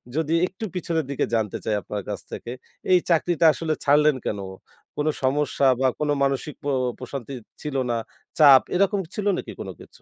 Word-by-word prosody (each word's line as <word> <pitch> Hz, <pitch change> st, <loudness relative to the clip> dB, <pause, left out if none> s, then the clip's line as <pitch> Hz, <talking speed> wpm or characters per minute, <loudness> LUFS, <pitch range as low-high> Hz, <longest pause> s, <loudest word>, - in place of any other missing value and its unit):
যদি 160 Hz, 0 st, 0 dB
একটু 195 Hz, +4 st, -7 dB
পিছনের 165 Hz, -3 st, -1 dB
দিকে 140 Hz, -, 0 dB
জানতে 110 Hz, -3 st, -1 dB
চাই 110 Hz, -, +1 dB
আপনার 105 Hz, -1 st, -5 dB
কাছ 100 Hz, -, -3 dB
থেকে 120 Hz, -, -6 dB, 0.4 s
এই 180 Hz, -, +7 dB
চাকরিটা 170 Hz, 0 st, +2 dB
আসলে 160 Hz, -1 st, -2 dB
ছাড়লেন 150 Hz, 0 st, +4 dB
কেন? 100 Hz, -, -2 dB, 0.6 s
কোন 150 Hz, +1 st, 0 dB, 0.2 s
সমস্যা 140 Hz, 0 st, +2 dB
বা 135 Hz, -, +3 dB
কোন 150 Hz, -1 st, -1 dB
মানসিক 135 Hz, +2 st, -1 dB
প -, -, -13 dB, 0.3 s
প্রশান্তি 135 Hz, 0 st, -6 dB, 0.3 s
ছিল 150 Hz, -2 st, -5 dB, 0.2 s
না, 120 Hz, -, 0 dB, 0.4 s
চাপ 140 Hz, -4 st, +9 dB
এরকম 200 Hz, +2 st, +2 dB, 0.2 s
ছিল 205 Hz, -, -3 dB
নাকি -, -, -6 dB
কোন -, -, -5 dB
কিছু? -, -, -16 dB
150 Hz, 175 wpm, -24 LUFS, 130-165 Hz, 0.6 s, চাপ